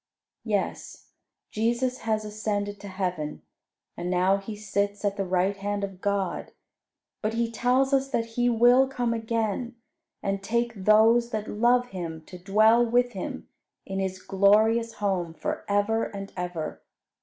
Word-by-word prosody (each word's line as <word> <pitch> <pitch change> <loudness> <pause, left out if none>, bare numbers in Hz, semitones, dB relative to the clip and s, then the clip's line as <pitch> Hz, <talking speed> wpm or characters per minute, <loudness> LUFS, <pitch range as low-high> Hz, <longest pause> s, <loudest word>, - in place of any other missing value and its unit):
Yes, - - -3 0.4
Jesus 240 +3 0
has 215 -1 -1
ascended 205 -1 -3
to 205 - -9
heaven, 180 -6 -3 0.5
and 175 +1 -4
now 185 +2 +3
He 200 +2 -7
sits 205 0 -2
at 200 -1 +1
the 200 - -1
right 185 +1 +1
hand 200 +1 -3
of 195 -2 -6
God; 200 -1 -2 0.7
but 220 +1 -1
He 230 0 0
tells 255 +4 +2
us 270 0 +2
that 230 -4 0
He 245 +1 +2
will 245 +3 +5
come 245 -3 -1
again, 230 +1 -2 0.5
and 195 0 -1
take 235 +3 0
those 220 +4 +4
that 215 -2 -3
love 245 +3 +2
Him 165 -4 -6
to 180 - -11
dwell 215 +5 +4
with 245 +1 +2
Him 190 -4 -6 0.4
in 195 0 -4
His 190 -1 -2
glorious 215 +4 +3
home 185 -6 -2
for 155 - -3
ever 205 +3 +1
and 195 -1 -7
ever. 175 -4 -4
210 Hz, 150 wpm, -26 LUFS, 195-235 Hz, 0.7 s, will